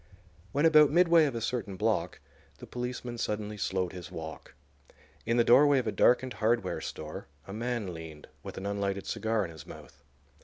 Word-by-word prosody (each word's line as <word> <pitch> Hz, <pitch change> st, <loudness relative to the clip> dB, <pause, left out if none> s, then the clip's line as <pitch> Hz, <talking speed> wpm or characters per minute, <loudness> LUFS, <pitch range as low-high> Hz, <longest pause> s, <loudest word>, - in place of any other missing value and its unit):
When 145 Hz, +3 st, +1 dB
about 155 Hz, -2 st, +7 dB
midway 170 Hz, 0 st, +5 dB
of 135 Hz, -5 st, -2 dB
a 115 Hz, -, -3 dB
certain 110 Hz, -4 st, -3 dB
block -, -, -1 dB, 0.4 s
the -, -, -10 dB
policeman 125 Hz, -1 st, -5 dB
suddenly 105 Hz, -1 st, -3 dB
slowed 95 Hz, -2 st, -2 dB
his 90 Hz, -2 st, -8 dB
walk. 80 Hz, -4 st, -8 dB, 0.7 s
In 115 Hz, +1 st, +2 dB
the 120 Hz, -, +5 dB
doorway 140 Hz, +4 st, +6 dB
of 130 Hz, -, 0 dB
a 110 Hz, -, 0 dB
darkened 125 Hz, +2 st, +3 dB
hardware 110 Hz, -3 st, +1 dB
store 75 Hz, 0 st, -7 dB, 0.2 s
a 95 Hz, -, -8 dB
man 115 Hz, -4 st, -3 dB
leaned, 80 Hz, -2 st, -10 dB
with -, -, -9 dB
an 95 Hz, -, -6 dB
unlighted 100 Hz, -1 st, -2 dB
cigar 110 Hz, 0 st, -1 dB
in 85 Hz, -, -8 dB
his 80 Hz, -2 st, -12 dB
mouth. -, -, -13 dB
110 Hz, 180 wpm, -29 LUFS, 95-125 Hz, 0.7 s, about